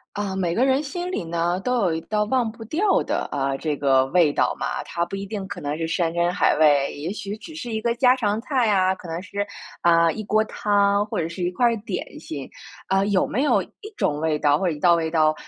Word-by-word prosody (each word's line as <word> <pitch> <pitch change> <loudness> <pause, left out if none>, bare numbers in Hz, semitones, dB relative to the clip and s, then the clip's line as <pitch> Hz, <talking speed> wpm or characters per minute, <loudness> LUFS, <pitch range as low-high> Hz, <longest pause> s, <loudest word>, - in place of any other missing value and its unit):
啊， 200 -2 -3
每 175 -3 0
个 245 +6 +2
人 270 +2 +2
心 350 +5 -4
里 365 - -3
呢， 170 +1 -1
都 250 - -1
有 175 -4 +2
一 160 - -3
道 210 +4 -1
忘 235 0 0
不 225 0 -11
掉 375 - +2
的， - - -2
呃， 135 -1 -1
这 150 -1 -2
个 135 -2 +3
味 165 -1 +3
道 - - +1
嘛。 - - -2
它 170 0 -2
不 175 - -6
一 195 0 -5
定 200 -1 -5
可 200 - -7
能 145 +1 -3
是 165 0 -2
山 165 0 0
珍 170 0 +1
海 - - +3
味， 145 -3 +4
也 155 +6 -4
许 205 0 -6
只 235 +9 -11
是 245 -7 -6
一 220 - -1
个 235 +1 0
家 250 +1 +5
常 215 -4 0
菜 255 -3 +1
啊， 190 -2 +3
可 185 - -11
能 165 +1 -4
是， 205 +1 -4 0.3
啊， 170 -1 +4
一 220 - -5
锅 215 +1 +2
汤 205 -1 +1
或 210 - -5
者 165 - -1
是 170 +2 -7
一 175 - +1
块 240 +7 +1
儿 235 -1 +3
点 195 - -5
心。 140 -4 -7 0.4
呃， 195 +1 +2
有 200 -3 +2
没 260 - -1
有 295 - +3
一 - - -16 0.3
种 145 - 0
味 155 -1 0
道 145 0 +2
或 - - -1
者 - - +1
一 150 - -8
道 175 -1 +6
味 165 -1 -1
道， 155 -1 +3
190 Hz, 275 characters per minute, -23 LUFS, 165-220 Hz, 0.4 s, 道